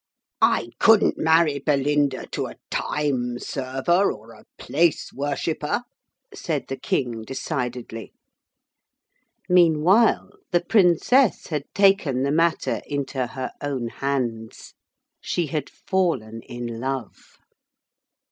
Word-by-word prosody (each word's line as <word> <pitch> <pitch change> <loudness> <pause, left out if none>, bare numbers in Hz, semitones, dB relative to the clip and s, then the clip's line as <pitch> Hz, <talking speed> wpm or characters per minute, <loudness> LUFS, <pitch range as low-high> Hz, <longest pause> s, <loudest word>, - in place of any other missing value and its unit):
'I 115 - +2
couldn't 225 -2 +5
marry 160 -2 +3
Belinda 145 -1 +1
to - - -2
a - - -10 0.2
time 125 -5 -1
server 135 +10 0
or 110 +2 -11
a - - -16
place 165 +1 0
worshipper,' 150 - -2 0.5
said 155 -5 -3
the 135 - -2
King 120 -4 -2
decidedly. 125 -2 -5 1.4
Meanwhile 180 +5 +4 0.2
the 175 -2 +2
Princess 205 - +3
had 150 -3 -2
taken 195 -10 +3
the 140 - 0
matter 165 +2 +1
into 140 -3 -2
her 130 +1 -5
own 135 -5 -3
hands. 120 -5 -4 0.5
She 175 - -1
had 150 0 -3
fallen 130 - -1
in 120 -1 -6
love. 130 -2 -5
140 Hz, 105 wpm, -23 LUFS, 125-170 Hz, 1.4 s, couldn't